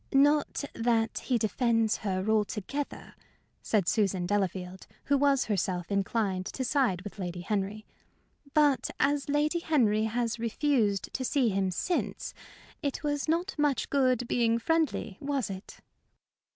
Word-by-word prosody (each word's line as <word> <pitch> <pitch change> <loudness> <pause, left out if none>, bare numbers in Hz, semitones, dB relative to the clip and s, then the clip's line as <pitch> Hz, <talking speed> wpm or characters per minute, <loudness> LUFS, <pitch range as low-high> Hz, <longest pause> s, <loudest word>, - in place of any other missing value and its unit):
"Not 290 +2 +3
that 230 -1 +1
he 250 - +2
defends 225 0 +1
her 190 -1 -2
altogether," 220 +6 -2 0.5
said 205 -6 +1
Susan 195 -5 +1
Delafield, 185 -1 -2 0.2
who 285 - +2
was 280 -1 +3
herself 185 -3 -1
inclined 195 -1 0
to 260 - -4
side 245 -9 +1
with 205 0 -9
Lady 175 -1 -4
Henry; 205 +2 -2 0.7
"but 295 -3 +3
as 285 0 +1
Lady 300 +4 +2
Henry 225 -10 +2
has 230 +1 -1
refused 230 -3 0
to 260 - -2
see 255 -2 +2
him 195 -1 0
since, 345 - -2 0.5
it 285 -1 -3
was 290 0 -1
not 340 +3 0
much 290 -2 +1
good 255 -3 +2
being 230 -1 +2
friendly, 305 - 0
was 275 -6 -1
it?" 190 +1 -9
230 Hz, 135 wpm, -29 LUFS, 200-280 Hz, 0.7 s, Not